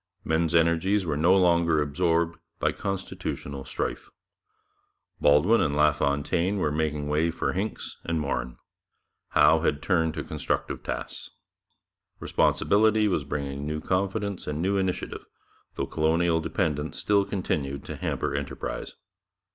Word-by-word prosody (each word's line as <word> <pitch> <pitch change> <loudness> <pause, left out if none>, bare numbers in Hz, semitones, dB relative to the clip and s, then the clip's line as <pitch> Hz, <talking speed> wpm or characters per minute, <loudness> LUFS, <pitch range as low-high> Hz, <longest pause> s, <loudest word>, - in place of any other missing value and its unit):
Men's 80 +1 +1
energies 85 +4 +3
were 75 -3 -1
no 85 +6 +4
longer 85 -3 +3
absorbed 85 +3 0 0.2
by - - +1
constitutional 80 -7 -5
strife. - - -4 1.1
Baldwin 75 +11 +5
and 70 -1 +1
LaFontaine 75 +5 +1
were 85 -6 0
making 75 -1 -1
way 75 +3 +1
for 70 -4 -2
Hincks 100 +4 -4
and 85 -1 -1
Morin; 65 -4 -3 0.8
Howe 75 +2 +6
had 75 -3 0
turned 80 -2 +1
to - - -3
constructive - - -3
tasks. - - -6 0.9
Responsibility 110 +1 +3
was 90 -7 0
bringing 70 0 -4
new 75 0 -2
confidence 95 +3 -2
and 75 0 -2
new 95 +4 +1
initiative, 95 -2 -2 0.5
though - - -1
colonial 80 +1 +1
dependence 80 -2 -2
still 100 -1 +3
continued 70 -9 -3
to - - -6
hamper - - -2
enterprise. 70 0 -4
80 Hz, 125 wpm, -26 LUFS, 75-95 Hz, 1.1 s, Howe